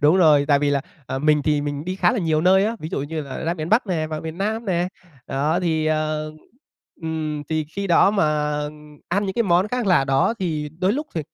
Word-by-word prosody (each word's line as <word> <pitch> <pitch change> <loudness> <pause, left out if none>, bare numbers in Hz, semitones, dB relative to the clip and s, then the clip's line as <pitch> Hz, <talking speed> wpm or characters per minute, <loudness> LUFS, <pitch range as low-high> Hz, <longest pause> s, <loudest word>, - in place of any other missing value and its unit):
Đúng 150 +4 +5
rồi, 155 -6 +5
tại 145 -1 +4
vì 145 0 +1
là, 140 -1 +1 0.3
à, 130 - -3
mình 150 +1 +3
thì 150 0 +1
mình 145 0 -4
đi 185 +2 -3
khá 175 -2 +3
là 245 - -1
nhiều 160 -4 +1
nơi 190 +3 +4
á, 225 +2 -1
ví 155 - -5
dụ - - -3
như 155 +2 -4
là 140 -2 -7
ra 165 +1 0
miền 155 -2 -5
Bắc 220 +4 +3
nè, 165 -5 -1
vào 155 -1 -4
miền 160 +1 -7
Nam 220 +3 -1
nè. 180 -2 0 0.4
Đó 150 +6 0
thì 160 -3 0
ờ, 155 0 -1 0.7
ừm, 155 -2 -3
thì 155 -1 0
khi 195 +7 -5
đó 175 +2 +5
mà 200 -4 +2 0.8
ăn 200 +4 0
những 190 - -2
cái 235 - +2
món 185 0 +2
khác 245 0 -2
lạ 180 -8 +4
đó 135 +10 +2
thì 155 -5 -2
đôi 185 +2 +2
lúc 295 +6 -3
th - - -1
160 Hz, 245 wpm, -22 LUFS, 150-190 Hz, 0.8 s, Đúng